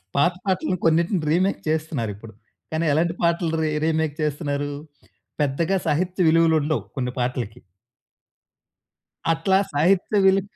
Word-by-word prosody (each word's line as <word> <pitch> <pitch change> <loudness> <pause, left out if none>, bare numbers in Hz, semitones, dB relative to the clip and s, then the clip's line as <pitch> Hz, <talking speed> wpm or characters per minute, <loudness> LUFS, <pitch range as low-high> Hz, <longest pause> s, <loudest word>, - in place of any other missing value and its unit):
పాత 145 +6 +3
పాటలను 185 -1 0
కొన్నిటిని 170 +4 +2
రీమేక్ 185 +4 +1
చేస్తున్నారిప్పుడు. 115 -9 -3 0.4
కానీ, 160 +1 -1
ఎలాంటి 165 +3 +1
పాటలు 170 -1 +1
రీ 155 - +1 0.2
రీమేక్ 160 -2 0
చేస్తున్నారూ, 145 -1 -2 0.7
పెద్దగా 150 +6 +1
సాహిత్య 180 +4 +1
విలువలుండవు 160 -2 +3
కొన్ని 125 -2 -2
పాటలకి. 120 -3 -3 1.7
అట్లా 190 +4 +2 0.2
సాహిత్య 180 +7 +2
విలు 195 0 +5
160 Hz, 110 wpm, -23 LUFS, 145-175 Hz, 1.7 s, విలు